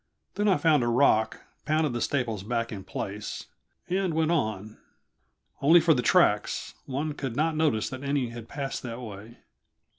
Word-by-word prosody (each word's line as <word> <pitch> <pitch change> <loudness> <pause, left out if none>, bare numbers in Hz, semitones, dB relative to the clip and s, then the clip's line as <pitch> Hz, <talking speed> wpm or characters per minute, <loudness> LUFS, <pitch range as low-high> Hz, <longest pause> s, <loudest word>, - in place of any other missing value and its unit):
Then 205 +1 0
I 195 - +4
found 150 -2 +3
a 120 - 0
rock, 115 -3 +2 0.2
pounded 155 -2 +1
the 120 - -2
staples 120 -7 -1
back 115 +2 -2
in 100 -3 -6
place, 100 +2 -5 0.4
and 185 -2 0
went 160 0 +2
on; 110 - -2 0.8
only 160 +5 +7
for 165 -1 +4
the 125 - 0
tracks, 115 - +2
one 145 +3 -2
could 135 -5 -5
not 155 +3 +1
notice 150 -9 +1
that 130 0 -6
any 140 -3 0
had 115 -1 -9
passed 140 -1 -4
that 120 -1 -6
way. 110 -1 -9
130 Hz, 170 wpm, -27 LUFS, 115-155 Hz, 0.8 s, only